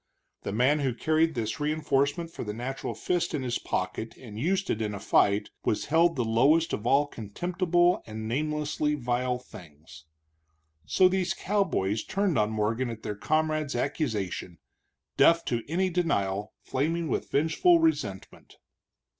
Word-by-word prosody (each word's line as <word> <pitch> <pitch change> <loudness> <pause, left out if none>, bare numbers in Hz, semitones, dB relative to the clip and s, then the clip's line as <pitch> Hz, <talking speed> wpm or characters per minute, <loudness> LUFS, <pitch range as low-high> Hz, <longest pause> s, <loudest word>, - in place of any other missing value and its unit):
The - - -4
man 130 +8 +3
who 130 -4 -1
carried 160 +3 +1
this 110 -2 -3
reenforcement 150 +2 0
for - - -6
the 105 -2 -5
natural 135 +3 -4
fist 175 -2 -1
in 140 - -2
his 125 -2 -1
pocket 110 - -3
and 110 -4 -9
used 190 +8 0
it 110 - -2
in 105 -1 -2
a - - -6
fight 100 +2 +2
was 105 - 0
held 165 +1 +4
the 125 -4 0
lowest 140 +9 +3
of 105 - -3
all 140 +3 +4
contemptible 175 - 0
and 110 0 -6
namelessly 150 +3 -1
vile 125 -1 -1
things. 80 - -14 0.8
So, 185 - +5
these 185 -1 0
Texas - - -14
cowboys 155 - 0
turned 195 - 0
on 105 0 +2
Morgan 110 +3 -1
at 115 -1 -7
their 105 - -3
comrade's 155 +6 0
accusation, 110 - -2 0.6
deaf 165 0 +5
to 120 -1 -1
any 185 +3 +1
denial, 105 - -1
flaming 160 +5 -1
with - - -2
vengeful 160 - +4
resentment. 325 -1 -2
140 Hz, 155 wpm, -28 LUFS, 110-165 Hz, 0.8 s, So